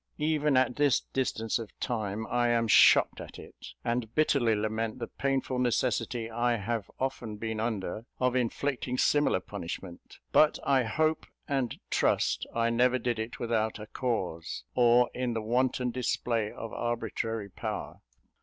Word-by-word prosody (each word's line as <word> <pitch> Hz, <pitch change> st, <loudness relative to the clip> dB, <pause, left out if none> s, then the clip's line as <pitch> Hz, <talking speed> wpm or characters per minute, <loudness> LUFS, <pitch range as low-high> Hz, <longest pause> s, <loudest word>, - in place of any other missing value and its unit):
Even 150 Hz, -2 st, +2 dB
at 130 Hz, -1 st, +2 dB
this 145 Hz, -4 st, +3 dB
distance 115 Hz, -4 st, -1 dB
of 115 Hz, -2 st, -9 dB
time, 110 Hz, -2 st, -2 dB
I 120 Hz, +1 st, +1 dB
am 115 Hz, -1 st, +2 dB
shocked 105 Hz, -, +6 dB
at -, -, -10 dB
it, -, -, -12 dB, 0.2 s
and 120 Hz, -2 st, -1 dB
bitterly 135 Hz, -7 st, +3 dB
lament 110 Hz, +2 st, -2 dB
the 120 Hz, -, -3 dB
painful 135 Hz, 0 st, -1 dB
necessity 120 Hz, -1 st, 0 dB
I 120 Hz, +1 st, +1 dB
have 110 Hz, 0 st, -3 dB
often 125 Hz, -5 st, -3 dB
been 110 Hz, 0 st, -3 dB
under 110 Hz, -1 st, -3 dB
of 125 Hz, 0 st, +1 dB
inflicting 125 Hz, +1 st, -1 dB
similar 145 Hz, -7 st, +3 dB
punishment; 85 Hz, 0 st, -8 dB
but 155 Hz, 0 st, +5 dB
I 135 Hz, -3 st, +3 dB
hope 155 Hz, +7 st, 0 dB, 0.2 s
and 135 Hz, -4 st, -1 dB
trust -, -, +1 dB
I 115 Hz, 0 st, +2 dB
never 125 Hz, +2 st, +3 dB
did 120 Hz, -2 st, -2 dB
it 110 Hz, +1 st, -4 dB
without 110 Hz, -2 st, 0 dB
a 105 Hz, -, -8 dB
cause, 105 Hz, -9 st, -3 dB
or 120 Hz, 0 st, +4 dB
in 125 Hz, -1 st, -2 dB
the 110 Hz, -, -1 dB
wanton 125 Hz, +2 st, +1 dB
display 115 Hz, -3 st, -1 dB
of 115 Hz, -1 st, -7 dB
arbitrary 115 Hz, -2 st, -3 dB
power. -, -, -5 dB
120 Hz, 150 wpm, -29 LUFS, 110-130 Hz, 0.2 s, shocked